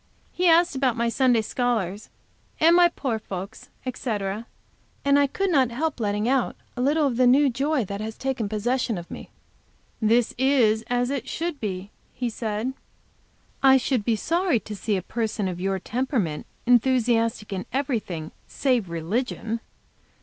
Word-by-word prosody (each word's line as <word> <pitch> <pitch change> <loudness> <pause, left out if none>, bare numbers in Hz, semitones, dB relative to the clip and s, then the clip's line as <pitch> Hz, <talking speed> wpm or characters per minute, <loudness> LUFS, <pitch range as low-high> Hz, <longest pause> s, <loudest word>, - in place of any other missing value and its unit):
He 360 0 +1
asked 340 -1 +5
about 260 -3 +1
my 235 0 +1
Sunday 245 -2 +3
scholars 215 -5 -1 0.5
and 330 +2 +6
my 350 0 +7
poor 260 -9 -3
folks, 195 +1 -7 0.2
etc., 215 -4 -3 0.6
and 280 0 +5
I 285 - +4
could 390 +7 -1
not 265 -6 +4
help 290 +4 -2
letting 210 0 0
out 260 -1 +1 0.2
a 250 - -3
little 295 +4 +3
of 250 -4 0
the 250 -1 +5
new 270 +2 +5
joy 275 0 0
that 200 +2 -5
has 220 0 -5
taken 260 -6 -2
possession 230 +1 0
of 170 0 -8
me. - - -8 0.7
"This 230 +2 +3
is 245 -5 +3
as 245 +1 0
it 265 -3 -3
should 335 -2 -3
be," 195 -1 -4 0.2
he 245 -2 -3
said. 220 +3 -3 0.9
"I 265 -1 +7
should 255 -3 0
be 230 +1 +1
sorry 335 - +1
to 215 - -7
see 205 +1 -1
a 185 - -4
person 220 -2 -2
of 180 -1 -4
your 195 0 0
temperament 220 - -2 0.2
enthusiastic 235 -3 +2
in 185 -1 -4
everything 220 - -2 0.2
save 250 -9 0
religion. 220 +7 -2
240 Hz, 160 wpm, -25 LUFS, 210-265 Hz, 0.9 s, my